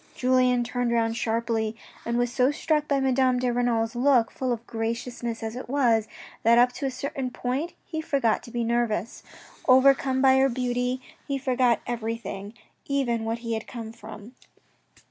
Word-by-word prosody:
Julien 250 -1 +3
turned 245 0 -1
round 225 -1 +1
sharply 225 -1 -1 0.3
and 235 0 0
was 245 0 0
so 255 -1 +3
struck 300 0 0
by 280 -1 +2
Madame 260 -1 +2
de 250 -1 0
Renal's 235 -2 0
look, 245 -2 +3
full 255 -1 -2
of 235 0 -3
graciousness 230 +1 -4
as 220 +1 -4
it 250 - -7
was, 235 -6 +2 0.3
that 230 +1 +5
up 245 +1 +5
to 275 +2 -3
a - - 0
certain 260 0 -4
point 260 +7 -3
he 315 -2 -4
forgot 275 -8 +1
to - - -12
be 235 0 -2
nervous. 230 -3 -1 0.5
Overcome 265 0 +5
by 265 0 +5
her 270 0 +4
beauty 250 0 -1 0.3
he 275 - -1
soon 270 - -11
forgot 250 -2 +2
everything, 225 -3 -5 0.3
even 245 -5 0
what 225 +1 -2
he 230 - -1
had 220 0 -4
come 225 -2 -7
for. 220 -1 -10
245 Hz, 175 wpm, -26 LUFS, 230-260 Hz, 0.5 s, that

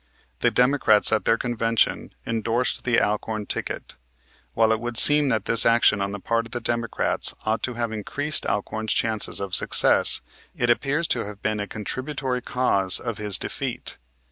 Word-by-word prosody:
The - - +2
Democrats 125 -5 +3
at 110 - 0
their 115 - +2
convention 115 -2 -1
endorsed 115 +2 -2
the 120 -2 +2
Alcorn 105 0 -2
ticket. - - -5 0.6
While 110 0 +3
it 110 - 0
would 120 0 -5
seem 145 +2 +6
that 110 -5 -1
this 115 0 +5
action 115 -3 +3
on 100 0 -2
the 100 - -6
part 115 +3 -2
of 115 - -14
the 120 - -3
Democrats 115 -1 -1
ought 110 +1 -1
to 125 - -4
have 115 -1 -3
increased 145 +8 -2
Alcorn's 105 +2 -2
chances 110 -2 +2
of 100 -2 -6
success, - - +4 0.3
it 120 0 +1
appears 145 +7 -1
to 120 - -1
have 100 0 -11
been 105 0 -1
a 105 - -4
contributory 130 +4 -4
cause 100 -7 +2
of 115 -4 -6
his 105 -2 +2
defeat. - - -5
115 Hz, 170 wpm, -23 LUFS, 105-125 Hz, 0.6 s, seem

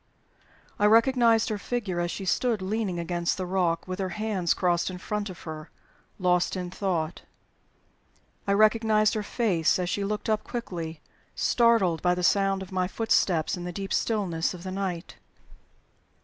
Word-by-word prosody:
I 205 - +5
recognized 230 0 +4
her 215 -2 -2
figure 205 -7 -3
as 175 0 0
she 195 - -5
stood 220 +2 +1
leaning 200 -2 -1
against 170 +2 -1
the 185 - -3
rock, 175 -2 0
with 185 +1 -5
her 190 -1 -1
hands 195 -2 -1
crossed 175 -1 +1
in 185 - -6
front 210 +2 -3
of 180 - -10
her, 155 -1 -8 0.5
lost 180 -1 +1
in 180 -1 -4
thought. 175 -4 -2 1.3
I 200 - +3
recognized 215 0 +4
her 215 - -1
face 200 -7 +1
as 180 -1 -2
she 200 - -1
looked 210 +1 -3
up 215 -1 +1
quickly, 170 -10 -5 0.3
startled 225 -9 +3
by 180 0 +2
the 180 - -3
sound 195 0 +2
of 190 - -12
my 185 -1 0
footsteps 185 -6 +1
in 175 - -7
the 180 - -4
deep 195 +2 -4
stillness 185 -7 0
of 175 - -11
the 185 - -5
night. 185 -2 -4
190 Hz, 165 wpm, -27 LUFS, 175-215 Hz, 1.3 s, I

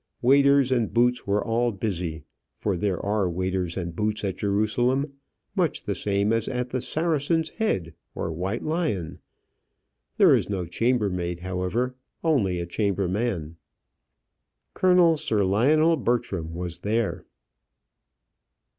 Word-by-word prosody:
Waiters 140 +1 +5
and 120 -4 +1
boots 125 0 +2
were 100 +1 +1
all 120 +1 +1
busy 90 -6 -3 0.3
for 100 -3 -1
there 90 0 -1
are 100 -2 +1
waiters 90 0 -2
and 85 -3 -4
boots 105 +2 -1
at 95 -2 -1
Jerusalem, 120 +7 +1 0.4
much - - 0
the - - -2
same 100 +1 0
as 115 -1 0
at 125 -1 -2
the 130 0 -2
"Saracen's 160 +2 0
Head," 95 - -1 0.2
or - - -3
"White 95 +8 -3
Lion;" 155 - -2 1.0
there - - +7
is - - -1
no 95 -3 -2
chambermaid, 90 -4 -1
however, 95 +7 -2 0.3
only 110 - +2
a 85 - -3
chamberman. 95 -2 -1 1.2
Colonel 180 -3 +4
Sir 110 -7 0
Lionel 155 - +3
Bertram 105 - -1
was 85 -1 -4
there. 110 +1 -1
105 Hz, 125 wpm, -25 LUFS, 90-125 Hz, 1.2 s, there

